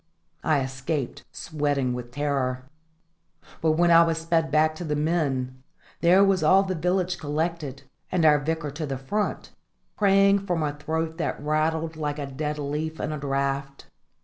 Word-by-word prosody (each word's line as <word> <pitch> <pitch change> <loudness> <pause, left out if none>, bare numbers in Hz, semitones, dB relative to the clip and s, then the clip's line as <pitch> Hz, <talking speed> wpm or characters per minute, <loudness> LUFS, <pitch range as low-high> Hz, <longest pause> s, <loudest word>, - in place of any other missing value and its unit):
I 150 -3 +2
escaped, 130 +1 -4
sweating 145 -5 -1
with 125 -1 -6
terror; 130 -2 -1 1.0
but 160 -1 +3
when 170 +2 +3
I 165 0 +8
was 165 -1 0
sped 165 0 0
back 155 +1 +3
to 175 - -5
the 150 -3 -1
men, 140 -5 -1 0.4
there 180 +3 +5
was 195 -2 +3
all 190 +5 +5
the 190 -1 -2
village 180 +1 0
collected, 150 -2 -3 0.3
and 180 -3 +2
our 150 -1 +6
Vicar 155 0 -2
to 150 +1 -5
the 135 -1 -3
front, 205 +11 -3 0.4
praying 195 0 +4
from 170 -3 0
a 145 -1 -1
throat 160 +2 -3
that - - -2
rattled 155 +2 -1
like 150 -1 -2
a 145 - -3
dead 150 +2 -4
leaf 150 +2 -3
in 155 - -2
a 155 - -4
draught. 140 0 -3
155 Hz, 165 wpm, -25 LUFS, 140-165 Hz, 1.0 s, I